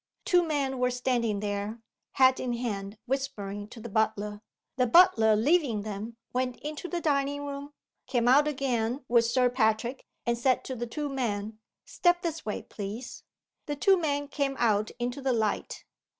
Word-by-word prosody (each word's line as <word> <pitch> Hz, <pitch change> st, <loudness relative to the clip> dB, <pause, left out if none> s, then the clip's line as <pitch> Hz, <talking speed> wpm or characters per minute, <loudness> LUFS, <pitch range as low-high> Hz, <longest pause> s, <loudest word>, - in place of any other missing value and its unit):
Two 355 Hz, -1 st, +5 dB
men 280 Hz, -5 st, -1 dB
were 250 Hz, 0 st, +2 dB
standing 245 Hz, -4 st, 0 dB
there, 205 Hz, +2 st, -3 dB, 0.3 s
hat 260 Hz, -1 st, +5 dB
in 245 Hz, -1 st, -2 dB
hand 210 Hz, -4 st, -4 dB
whispering 210 Hz, -7 st, -3 dB
to 230 Hz, -, -11 dB
the 225 Hz, -, -7 dB
butler. 210 Hz, -1 st, -1 dB, 0.4 s
The 250 Hz, -1 st, +3 dB
butler, 230 Hz, -, +6 dB
leaving 250 Hz, -3 st, +2 dB
them, 215 Hz, +2 st, -6 dB, 0.2 s
went 250 Hz, -1 st, -1 dB
into 305 Hz, +4 st, -5 dB
the 350 Hz, -, -2 dB
dining 285 Hz, -2 st, 0 dB
room 285 Hz, +1 st, -6 dB, 0.3 s
came 245 Hz, -2 st, +1 dB
out 285 Hz, +4 st, +6 dB
again 260 Hz, -3 st, -1 dB
with 235 Hz, -1 st, +4 dB
Sir 250 Hz, +2 st, +3 dB
Patrick 240 Hz, +1 st, 0 dB, 0.2 s
and 235 Hz, 0 st, 0 dB
said 255 Hz, +1 st, +2 dB
to 260 Hz, -, -5 dB
the 240 Hz, 0 st, -4 dB
two 295 Hz, +5 st, -3 dB
men, 220 Hz, -6 st, -3 dB, 0.3 s
"Step 350 Hz, 0 st, +2 dB
this 330 Hz, -2 st, -3 dB
way, 210 Hz, -, -4 dB
please." 215 Hz, +5 st, -7 dB, 0.5 s
The 295 Hz, -, -2 dB
two 385 Hz, +7 st, +4 dB
men 290 Hz, -5 st, -1 dB
came 280 Hz, -1 st, -1 dB
out 215 Hz, -2 st, +2 dB
into 245 Hz, +2 st, -3 dB
the 265 Hz, -1 st, +1 dB
light. 220 Hz, -3 st, -2 dB
250 Hz, 165 wpm, -28 LUFS, 220-280 Hz, 0.5 s, butler